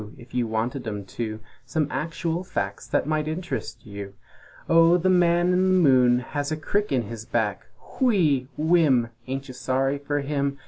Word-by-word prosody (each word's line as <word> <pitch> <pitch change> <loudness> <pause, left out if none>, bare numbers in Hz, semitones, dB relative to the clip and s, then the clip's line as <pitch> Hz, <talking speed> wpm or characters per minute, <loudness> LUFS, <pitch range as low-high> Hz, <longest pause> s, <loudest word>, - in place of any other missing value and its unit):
If 120 -1 -15
you 125 -2 0
wanted 115 +4 -2
'em 105 -2 -4
to 110 -2 -3 0.2
Some 140 +5 -1
actual 165 +4 -2
facts 100 - -4
that 120 - 0
might 155 0 -1
interest 175 +3 -5
you! 100 -2 -8 0.5
"O 165 +1 +6
the 185 +2 +2
Man 175 0 +3
in 185 +1 +3
the 185 - +4
Moon 125 -1 +4
has 145 +3 -4
a 155 - -1
crick 205 +6 -1
in 130 -3 +1
his 110 +1 -7
back; 110 -4 -2 0.3
Whee! 165 - +3
Whimm! 150 -7 +3 0.2
Ain't 135 +1 -4
you 130 - -8
sorry 135 +2 0
for 145 0 -2
him? 140 -1 -1
140 Hz, 175 wpm, -25 LUFS, 120-165 Hz, 0.5 s, O